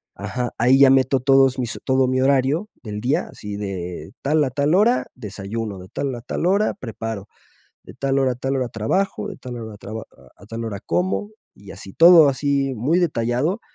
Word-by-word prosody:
Ajá, 125 -2 -4
ahí 125 +3 +4
ya 140 -1 +8
meto 130 0 +3
todos 135 0 +4
mis 120 -2 -3
todo 130 -1 +2
mi 130 0 0
horario 140 +7 +2 0.2
del 105 -2 -5
día, 125 +6 0
así 105 0 -7
de 90 -5 -6
tal 150 +2 +2
a 135 - 0
tal 145 +5 +1
hora, 225 +6 +3
desayuno, 105 0 -6
de 90 - -11
tal 135 +5 -3
a 120 - -8
tal 125 - -3
hora, 200 +4 +2
preparo, 115 - -6 0.6
de - - -12
tal 135 0 0
hora 135 -1 +2
a - - -11
tal 135 +2 -2
hora 130 -1 -1
trabajo, 185 - -1
de 200 - -9
tal 125 -1 -8
hora 110 -2 -8
traba 110 +2 -7
a 65 +9 -21
a - - -13
tal 115 +2 -6
hora 100 -3 -5
como, 190 +3 -1 0.2
y 100 -1 -13
así 95 - -11
todo 165 -2 +8
así 140 0 0
muy 145 +11 +1
detallado, 145 - 0
130 Hz, 200 wpm, -21 LUFS, 110-140 Hz, 0.6 s, ya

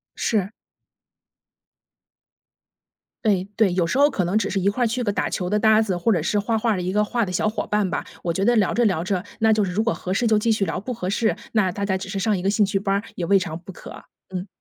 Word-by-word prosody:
是。 205 -3 0 2.7
哎， 195 -4 +2
对， 210 -5 +3
有 175 -1 +1
时 170 - -1
候 285 +1 +5
可 205 -10 -1
能 185 +5 +1
只 205 -2 0
是 195 - -1
一 195 +2 +2
块 245 +5 -1
儿 - - +3
去 245 +3 -2
个 205 - 0
打 - - -1
球 180 -1 -3
的 210 - +2
搭 220 +1 +5
子， 195 -5 -1
或 175 +6 +1
者 170 - 0
是 190 +6 0
画 225 +2 0
画 225 +1 +1
儿 205 - 0
的 - - -2
一 185 +1 -2
个 210 +1 +3
画 230 +2 0
的 185 - -5
小 180 +4 +1
伙 215 - -3
伴 210 -2 0
吧， - - -3 0.2
我 170 - 0
觉 190 +4 -1
得 240 - +4
聊 210 -5 +2
着 240 - +2
聊 180 -6 +1
着， 185 -1 -1 0.2
那 220 -1 +4
就 215 -1 +3
是 180 - -4
如 210 +5 0
果 230 - +1
合 185 - -4
适 235 +4 +1
就 220 -1 +4
继 225 +2 +1
续 215 -3 +1
聊， 180 - -3
不 250 +6 -5
合 185 -6 -4
适， 220 +2 +1 0.2
那 205 -5 +2
大 200 +3 -5
家 190 -1 0
只 190 - -7
是 195 0 -3
上 210 0 +1
一 - - -4
个 190 - +1
兴 210 +1 +3
趣 195 0 -1
班 195 0 0
儿， 200 - -1
也 175 - -3
未 195 +3 +4
尝 160 -3 -4
不 180 +2 -11
可。 - - -11 0.3
嗯。 185 +1 -5
200 Hz, 305 characters per minute, -23 LUFS, 185-220 Hz, 2.7 s, 候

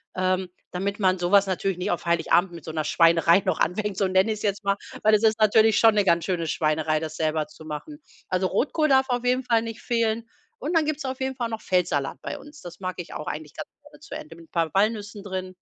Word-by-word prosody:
ähm, 185 0 0 0.2
damit 200 +3 -3
man 185 -2 +3
so 175 +1 -2
was 200 -1 +5
natürlich 190 0 -1
nicht 180 - -2
auf 175 - -2
Heiligabend 170 +2 +2
mit 170 -3 -10
so 160 - -5
'ner 155 -1 -2
Schweinerei 165 +3 +4
noch 185 -4 0
anfängt, 205 +2 -1
so 195 - +2
nenne 190 +3 +3
ich's 215 - -4
jetzt 205 0 -1
mal, 200 0 +2 0.3
weil 215 0 +5
es 210 - 0
ist 220 0 +3
natürlich 215 0 +5
schon 225 -2 +5
'ne 205 - +3
ganz 170 -3 +3
schöne 175 -3 -1
Schweinerei, 155 0 0
das 155 0 -6
selber 155 -1 -1
zu 155 +1 -15
machen. 155 - -7 0.3
Also 185 0 0
Rotkohl 300 - +1
darf 265 -1 +4
auf 245 0 -1
jeden 250 +1 +2
Fall 230 -2 +2
nicht 225 -1 -7
fehlen. 230 -2 0 0.3
Und 310 +6 -3
dann 315 - +2
gibt's 305 -2 -3
auf 260 0 -4
jeden 265 0 -2
Fall 240 -2 -3
noch 225 -1 -5
Feldsalat 165 -7 0
bei - - -5
uns. 295 +1 -14
Das 175 0 -10
mag 185 -1 -4
ich 175 - -7
auch 150 - -5
eigentlich 150 0 -6
ganz - - -7
gerne 295 - -18
zu 310 - -9
Ente 310 -1 -9
mit 165 -1 -16
paar 165 -2 0
Walnüssen 205 0 0
drin. 185 -2 -5
195 Hz, 245 wpm, -25 LUFS, 170-225 Hz, 0.3 s, was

